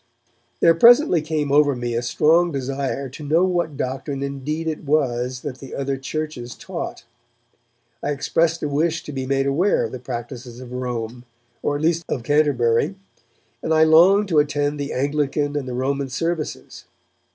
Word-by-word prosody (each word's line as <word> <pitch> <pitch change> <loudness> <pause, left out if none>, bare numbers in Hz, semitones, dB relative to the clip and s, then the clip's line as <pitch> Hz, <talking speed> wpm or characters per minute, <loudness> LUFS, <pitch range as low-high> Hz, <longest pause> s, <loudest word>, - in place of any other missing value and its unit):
There 165 - +6
presently 235 - +6
came 150 -2 -2
over 145 -1 +4
me 120 -1 -3
a 115 - 0
strong 160 +8 +3
desire 135 0 -3
to 150 +4 -10
know 160 +5 +3
what 175 -6 0
doctrine 135 +2 -3
indeed 140 +4 -3
it 155 -1 -3
was 130 -4 0
that 135 -3 -6
the 135 - -9
other 140 0 -2
Churches 135 -3 -5
taught. - - -6 1.0
I - - -2
expressed 165 +3 0
a - - +1
wish 155 +3 0
to - - -7
be 130 -2 -4
made 135 0 +1
aware 165 +9 +2
of - - -3
the 130 - -6
practices 120 0 -7
of 125 -1 -10
Rome, 125 -1 -4 0.4
or 145 - 0
at 145 - -3
least 165 +1 +2
of 120 - -2
Canterbury, 145 +1 +2 0.7
and 160 - +1
I 160 - +6
longed 180 +6 +6
to 160 -4 +4
attend 145 0 0
the 140 0 -3
Anglican 145 +1 -1
and 140 -3 -2
the 125 - -4
Roman 135 +2 -1
services. 165 +4 -4
145 Hz, 170 wpm, -22 LUFS, 130-155 Hz, 1.0 s, There